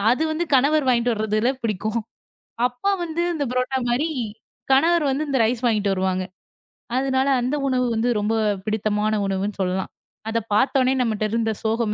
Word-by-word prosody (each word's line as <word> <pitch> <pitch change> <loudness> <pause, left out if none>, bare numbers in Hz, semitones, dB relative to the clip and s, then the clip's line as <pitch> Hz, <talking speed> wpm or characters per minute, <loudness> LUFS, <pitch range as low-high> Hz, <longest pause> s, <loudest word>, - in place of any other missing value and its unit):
அது 295 - 0
வந்து 325 +2 -1
கணவர் 285 +2 +3
வாங்கிட்டு 240 -1 +3
வர்றதுல 215 +2 +1
பிடிக்கும். 215 +1 -1 0.7
அப்பா 250 +11 -1
வந்து 335 +1 -2
அந்த 295 - -1
பரோட்ட்டா 255 +1 0
மாரி 255 +7 +1 0.6
கணவர் 330 +3 +4
வந்து 290 +3 -1
இந்த 275 - +1
ரைஸ் 240 +2 -1
வாங்கிட்டு 210 -3 +2
வருவாங்க. 185 0 -1 0.7
அதனால 265 0 +1
அந்த 255 +4 -1
உணவு 250 -1 +1
வந்து 230 +2 +1
ரொம்ப 210 +2 0 0.3
பிடித்தமான 215 0 0
உணவுன்னு 195 +1 -2
சொல்லலாம். 185 +1 -1 0.4
அதப் 225 -1 -2
பார்த்தோனே 260 +3 +3
நம்மட்ட 220 -3 0
இருந்த 225 -1 0
சோகம் 225 -1 0
235 Hz, 150 wpm, -22 LUFS, 215-265 Hz, 0.7 s, கணவர்